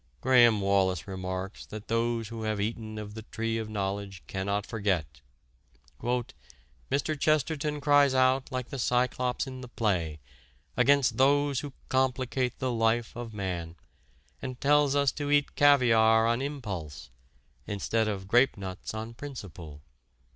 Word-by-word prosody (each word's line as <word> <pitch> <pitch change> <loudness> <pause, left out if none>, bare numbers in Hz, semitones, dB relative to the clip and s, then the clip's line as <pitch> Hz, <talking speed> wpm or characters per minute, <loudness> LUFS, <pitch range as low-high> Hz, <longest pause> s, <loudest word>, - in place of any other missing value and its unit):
Graham 120 -4 +5
Wallas 95 -3 +1
remarks 95 0 -5
that 105 -1 -8
those 115 -1 0
who 115 -1 -6
have 110 -1 -2
eaten 110 +1 -3
of 105 -1 -7
the 110 - -7
tree 115 0 -3
of 110 -1 -5
knowledge 100 -2 -4
cannot 100 +1 -2
forget 95 -11 -2 0.8
"Mr. 120 - -4
Chesterton 150 0 +1
cries 145 -2 +4
out, 130 +1 +2
like 130 -1 -3
the 135 - -5
Cyclops 125 +1 0
in 130 -1 -8
the 125 - -8
play, 90 -11 -1 0.6
against 140 -2 +3
those 140 0 +3
who 145 -2 -7
complicate 130 -1 0
the 130 -1 -1
life 115 0 +1
of 120 -1 -6
man, 90 -5 -4 0.7
and 130 -1 -6
tells 145 0 +3
us 140 -2 +3
to 145 -1 -4
eat 145 -1 +2
'caviare 115 -6 +5
on 115 +2 +1
impulse,' 105 - -5 0.6
instead 110 +2 0
of 95 -3 -3
'grapenuts 105 -5 +1
on 110 +1 -5
principle.' 95 - -9
115 Hz, 135 wpm, -28 LUFS, 100-130 Hz, 0.8 s, Graham